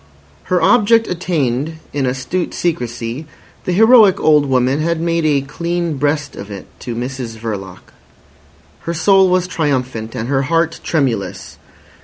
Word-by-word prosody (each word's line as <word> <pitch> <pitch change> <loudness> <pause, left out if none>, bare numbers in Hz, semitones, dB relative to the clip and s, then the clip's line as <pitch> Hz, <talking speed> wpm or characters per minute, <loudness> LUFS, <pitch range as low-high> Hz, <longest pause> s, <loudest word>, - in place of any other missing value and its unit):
Her 180 - +1
object 230 -1 +4
attained 160 -5 -1 0.2
in 140 -2 0
astute 135 +8 -2
secrecy, 125 -3 -3 0.4
the - - -1
heroic 220 0 +6
old 150 -2 +4
woman 130 +1 +1
had 170 +1 0
made 165 -1 0
a 145 -2 +2
clean 170 +3 -3
breast 145 0 -1
of 100 - -8
it 100 -2 -8
to 120 - -5
Mrs 125 -1 -5
Verloc. 100 -5 -7 0.9
Her 170 - -4
soul 190 +3 +4
was 180 0 +2
triumphant 130 -10 -2
and 115 - -3
her 135 0 +1
heart 165 +3 0
tremulous. 130 - -2
145 Hz, 140 wpm, -17 LUFS, 125-170 Hz, 0.9 s, heroic